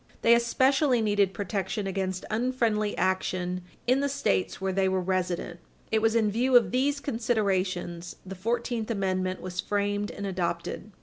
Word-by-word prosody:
They 230 - +7
especially 260 +3 +3
needed 205 -3 +2
protection 200 +1 -3
against 190 -1 -2
unfriendly 225 -3 0
action 185 -1 0 0.2
in 255 +2 +3
the 280 0 0
States 95 - 0
where 190 0 -1
they 190 0 +2
were 190 0 +1
resident. 180 -1 -2 0.3
It 220 0 +2
was 225 +1 +2
in 220 -2 +3
view 250 +4 +2
of 220 -7 +2
these 280 +3 +1
considerations 195 -9 -1
the 190 - -6
Fourteenth 230 +3 -2
Amendment 185 -3 -1
was 180 -1 -6
framed 205 +1 0
and 200 - -6
adopted. 180 -3 -3
205 Hz, 150 wpm, -27 LUFS, 185-235 Hz, 0.3 s, They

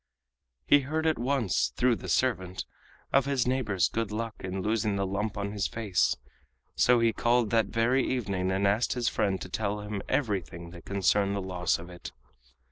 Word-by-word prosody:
He 145 - +6
heard 155 +4 -2
at 160 -5 +2
once, 120 -6 +1
through 125 -2 +2
the 95 - -8
servant, 95 -3 0 0.5
of 135 -1 +4
his 140 -3 +1
neighbor's 115 -9 +1
good 115 -2 -3
luck 115 +1 -3
in 95 0 -4
losing 105 -1 0
the 100 0 0
lump 100 +2 -2
on 100 0 -2
his 100 -2 -1
face, 105 -5 +1 0.6
so 125 -1 +4
he 115 -1 +3
called 120 -2 +2
that 115 -3 +3
very 125 +4 +2
evening 100 -7 -1
and 95 +1 +1
asked 105 +4 +2
his 120 -1 -1
friend 95 -2 0
to - - -5
tell 105 +1 -2
him 105 -1 -4
everything 90 - -2
that 85 -1 -12
concerned 100 0 +1
the - - -1
loss 90 -3 0
of 85 - -10
it. 90 - -9
105 Hz, 185 wpm, -28 LUFS, 95-120 Hz, 0.6 s, He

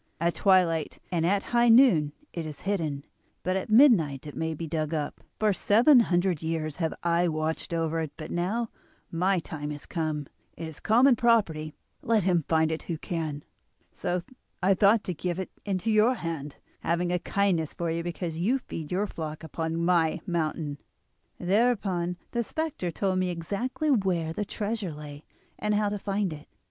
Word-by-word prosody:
At 170 +1 +1
twilight 175 -5 +2
and 170 -2 +1
at 195 +2 +2
high 240 0 +5
noon 225 - +6 0.2
it 170 - -3
is 155 -2 -8
hidden, 160 -8 -2 0.4
but 185 +1 0
at 190 - -2
midnight 215 - +5
it 145 -4 -8
may 160 +2 -2
be 165 - -5
dug 155 0 -2
up. 150 -2 -3 0.2
For 215 -1 +2
seven 240 +9 +5
hundred 180 -6 +1
years 160 -2 -2
have 165 -3 -1
I 170 +1 +2
watched 155 0 -2
over 165 -1 0
it, 160 -3 -3
but 155 -1 -7
now 210 +7 -1 0.4
my 185 +3 +2
time 155 -3 -5
has 145 -1 -7
come; 155 -3 -2 0.3
it 165 - -5
is 160 -2 -10
common 245 +4 +5
property, 185 -11 +2 0.3
let 220 -3 +2
him 175 -4 +2
find 160 -1 +2
it 160 - -2
who 170 - -4
can. 155 -3 -4 0.5
So 180 0 -2 0.4
I 195 +2 +5
thought 205 +3 +4
to 180 - -3
give 175 +2 -3
it 190 - -4
into 200 +2 -1
your 215 +4 +4
hand, 160 - -5 0.2
having 175 +1 0
a 180 - +1
kindness 180 -5 0
for 170 -2 -2
you 165 +1 -1
because 170 -1 -4
you 225 +10 +2
feed 160 - -7
your 190 +3 +1
flock 155 -5 -6
upon 160 +1 -3
my 170 -3 +3
mountain.' 155 -5 -2 0.6
"Thereupon 190 -3 +1
the 235 - 0
spectre 310 - -3
told 185 +2 0
me 185 -1 0
exactly 205 - -2
where 180 - +1
the 205 - -2
treasure 205 -4 -3
lay, 145 0 -10 0.3
and 210 0 +1
how 210 0 +2
to 205 0 -3
find 195 -3 -1
it. 150 0 -11
175 Hz, 180 wpm, -27 LUFS, 160-205 Hz, 0.6 s, noon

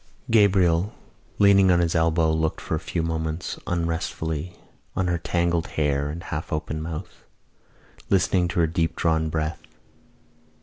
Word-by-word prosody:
Gabriel, 95 -3 +3 0.4
leaning 100 -1 +6
on 90 - +5
his 85 -2 +1
elbow, 80 -1 +2
looked 80 0 0
for - - -5
a 80 - +1
few 85 0 -3
moments 80 0 -3
unresentfully 85 -1 -2 0.4
on 95 - 0
her 85 -1 0
tangled 85 0 0
hair 70 -2 +1
and 85 +3 -6
half 75 +5 -5
open 75 0 -3
mouth, 80 +3 -7 0.9
listening 95 -2 +3
to 85 - -2
her 85 - +5
deep 80 0 -1
drawn 80 -1 +1
breath. 80 +1 -2
80 Hz, 140 wpm, -24 LUFS, 80-90 Hz, 0.9 s, leaning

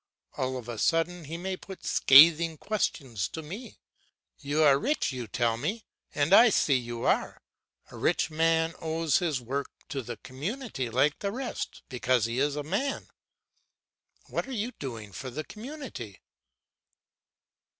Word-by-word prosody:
All 130 0 -2
of 120 -2 -8
a 120 -3 -5
sudden 165 +4 +1
he 160 +4 -5
may 190 +2 -3
put 190 0 -11
scathing 160 +3 +7
questions 135 - -2
to 160 - -7
me. 200 +11 -8 0.6
"You 145 +2 +1
are 140 -2 +6
rich, 290 - 0
you 125 -3 -5
tell 115 +2 0
me, 200 - -3 0.3
and 150 +4 +2
I 235 +4 +9
see 155 -7 +3
you 120 -2 -3
are. - - +1 0.5
A - - -10
rich 155 - +1
man 165 +1 +2
owes 160 -2 +1
his 160 -7 0
work 135 +4 -3 0.2
to 140 -2 -3
the 120 0 -7
community 150 - -5
like 130 +6 +2
the 200 -1 -2
rest 250 +2 -5
because 125 -2 +1
he 115 +2 -2
is 145 +1 +1
a 150 - -3
man. 205 - -2 1.2
What - - -3
are - - -7
you 230 +1 -2
doing 115 - -7
for 130 +7 -6
the 150 +5 -5
community?" 220 - -8
150 Hz, 155 wpm, -28 LUFS, 130-185 Hz, 1.2 s, I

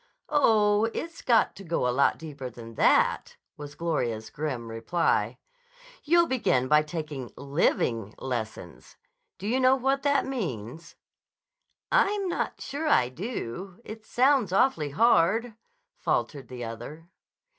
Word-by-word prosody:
"Oh, 215 -7 +4
it's 335 0 -5
got 235 -3 +3
to 195 - -9
go 165 -7 -1
a - - +2
lot 140 +2 +3
deeper 145 -5 -7
than 115 -1 -11
that," - - +2 0.2
was 145 0 -9
Gloria's 120 -10 -2
grim 135 -6 -4
reply. 115 +10 0 0.7
"You'll 340 +3 +4
begin 130 - +1
by 150 +2 +5
taking 150 -5 -6
living 120 - 0
lessons. 110 -8 -6 0.4
Do 195 - -6
you 250 +4 +1
know 260 0 +5
what 270 +1 0
that 285 0 +2
means?" 165 - -5 1.0
"I'm 415 -5 +2
not 350 - -3
sure 290 +4 -4
I 125 - +4
do. 185 - -6
It 215 0 -9
sounds 255 -3 +2
awfully 185 - +2
hard," 225 - +3 0.5
faltered 140 -3 -1
the 125 -1 -7
other. 120 +9 -8
165 Hz, 130 wpm, -27 LUFS, -, 1.0 s, by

